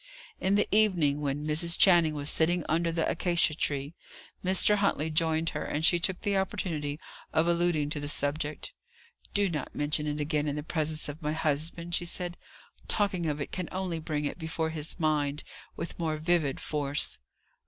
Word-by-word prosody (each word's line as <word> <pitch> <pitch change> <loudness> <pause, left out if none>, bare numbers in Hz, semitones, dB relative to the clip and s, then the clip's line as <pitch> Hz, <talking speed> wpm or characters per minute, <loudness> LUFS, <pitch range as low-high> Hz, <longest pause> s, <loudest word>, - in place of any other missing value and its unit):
In 190 +1 +2
the 205 - +3
evening, 170 -10 +3
when 145 +1 -2
Mrs. 165 +3 +1
Channing 170 -5 +6
was 145 0 +1
sitting 170 +1 +2
under 165 +1 +1
the 165 0 0
acacia 170 -2 +2
trees, 145 0 -2 0.5
Mr. 190 +3 +4
Huntley 160 -6 +1
joined 160 +1 +1
her, - - -3
and 150 +2 -1
she 175 0 +5
took 185 +2 -1
the 200 -2 +1
opportunity 165 -7 -2 0.3
of 160 +2 +2
alluding 170 -4 +1
to 150 - -2
the 145 0 -4
subject. 150 - -1 0.6
"Do 205 0 +3
not 155 -6 -4
mention 150 +1 +1
it 150 0 -2
again 150 0 0
in 145 - -1
the 150 - -4
presence 155 -1 -1
of 150 +3 -7
my 150 0 -1
husband," 160 +2 -1
she 175 - +1
said: 175 0 -3 0.5
"talking 190 -5 +1
of 150 -1 -2
it 145 - -4
can 180 -2 -4
only 185 -3 -2
bring 150 -2 -2
it 145 - -4
before 160 0 -2
his 155 +2 -4
mind 150 -2 0 0.3
with 170 - -6
more 160 -2 -1
vivid 155 -3 +1
force. 145 -1 0
160 Hz, 180 wpm, -29 LUFS, 150-175 Hz, 0.6 s, Channing